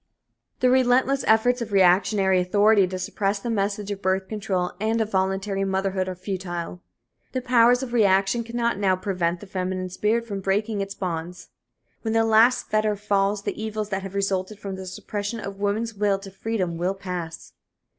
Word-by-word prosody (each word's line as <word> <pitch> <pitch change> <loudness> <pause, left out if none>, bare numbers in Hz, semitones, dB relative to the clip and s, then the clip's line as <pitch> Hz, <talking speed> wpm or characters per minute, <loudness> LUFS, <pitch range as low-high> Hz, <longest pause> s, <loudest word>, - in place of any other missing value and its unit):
The 250 0 +4
relentless 260 +1 +3
efforts 245 +3 +3
of 225 -2 -4
reactionary 190 0 +4
authority 205 +2 +4
to 185 +1 -4
suppress 195 +2 -1
the 230 +4 -4
message 205 -1 -1
of 200 -1 -5
birth 190 0 0
control 195 -4 -2
and 220 +1 +1
of 220 -1 -1
voluntary 195 +1 0
motherhood 190 -1 -1
are 185 - -4
futile. 180 -2 -5 0.5
The 255 - -1
powers 245 +1 +4
of 245 -2 -6
reaction 200 0 +3
cannot 235 -2 -1
now 190 -2 +3
prevent 180 -2 -2
the - - -8
feminine 185 -1 -3
spirit 215 +5 0
from 200 -3 -5
breaking 205 +2 0
its 195 0 -5
bonds. 175 -1 -5 0.5
When 225 -1 -2
the 225 0 +4
last 225 +3 +4
fetter 215 -1 +2
falls 200 0 0
the - - -4
evils 215 -1 -3
that 195 -1 -2
have 195 0 -8
resulted 195 +1 -1
from 200 -1 -6
the 190 0 -8
suppression 205 +4 -4
of 195 -1 -7
woman's 215 +3 -1
will 205 -1 +1
to 195 0 -10
freedom 190 -4 -2
will 180 +3 -1
pass. 180 -4 -6
200 Hz, 175 wpm, -24 LUFS, 190-220 Hz, 0.5 s, The